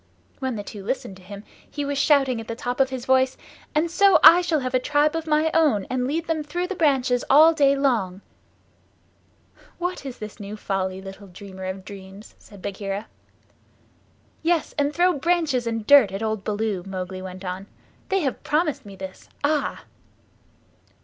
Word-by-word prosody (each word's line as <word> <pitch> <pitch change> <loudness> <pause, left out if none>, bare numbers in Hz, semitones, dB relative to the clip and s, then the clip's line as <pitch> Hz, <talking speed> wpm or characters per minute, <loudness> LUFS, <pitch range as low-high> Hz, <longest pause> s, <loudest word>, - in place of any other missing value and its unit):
When 260 -3 -2
the 205 - -5
two 200 -1 -9
listened 220 -3 -3
to - - -16
him 200 +2 -10 0.3
he 290 -1 -4
was 285 0 -2
shouting 270 -5 +3
at 225 - -11
the 230 - -4
top 245 +2 -4
of 265 -1 +3
his 260 -2 -5
voice, 260 0 +2 0.4
"And 320 +2 +1
so 395 +2 +5
I 345 +2 +10
shall 325 -4 0
have 255 0 -3
a 255 - +3
tribe 295 +4 +1
of 325 -1 -3
my 310 +1 +2
own, 295 -12 +3
and 250 0 0
lead 320 +4 -2
them 320 -2 -1
through 350 +5 -3
the 390 +1 -4
branches 265 -6 +2
all 315 +4 +7
day 280 -3 +4
long." 225 -9 0 1.6
"What 355 -2 -3
is 260 -3 -7
this 215 0 -9
new 205 +1 -7
folly, 190 -2 -3
little 195 +1 -10
dreamer 190 0 -10
of 190 0 -5
dreams?" 195 +1 -11
said 200 -3 -16
Bagheera. 200 +1 -4 1.4
"Yes, 330 -1 0
and 285 -1 +1
throw 355 +3 +3
branches 300 -5 0
and 225 -2 -3
dirt 275 -7 +7
at 195 +3 -4
old 220 -2 -2
Baloo," 210 -2 -2
Mowgli 185 -1 -6
went 185 0 -8
on. 185 +2 -5 0.4
"They 390 0 +1
have 270 -5 -2
promised 305 -1 0
me 200 - -10
this. 190 0 -10
Ah!" 295 +1 0
255 Hz, 180 wpm, -24 LUFS, 200-300 Hz, 1.6 s, I